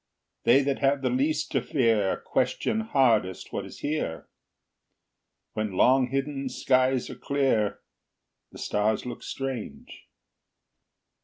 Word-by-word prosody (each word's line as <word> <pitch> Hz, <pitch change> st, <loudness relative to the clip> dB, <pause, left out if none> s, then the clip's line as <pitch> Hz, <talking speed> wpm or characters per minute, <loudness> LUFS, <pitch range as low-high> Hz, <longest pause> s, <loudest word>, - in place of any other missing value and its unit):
They 135 Hz, +4 st, +6 dB
that 140 Hz, 0 st, -1 dB
have 140 Hz, 0 st, +1 dB
the 130 Hz, -, +1 dB
least 140 Hz, +5 st, 0 dB
to 135 Hz, -, +1 dB
fear 115 Hz, -6 st, +1 dB
Question 220 Hz, -, -1 dB
hardest 120 Hz, -, +1 dB
what -, -, -3 dB
is -, -, -12 dB
here; 145 Hz, -, -3 dB, 1.3 s
When 110 Hz, -2 st, -2 dB
long 130 Hz, +6 st, +4 dB
hidden 135 Hz, +1 st, -2 dB
skies 130 Hz, 0 st, +1 dB
are -, -, -7 dB
clear, 135 Hz, -7 st, 0 dB, 0.7 s
The -, -, -12 dB
stars 105 Hz, +3 st, 0 dB
look 120 Hz, -2 st, -6 dB
strange. 135 Hz, -4 st, -6 dB
130 Hz, 115 wpm, -27 LUFS, 115-135 Hz, 1.3 s, They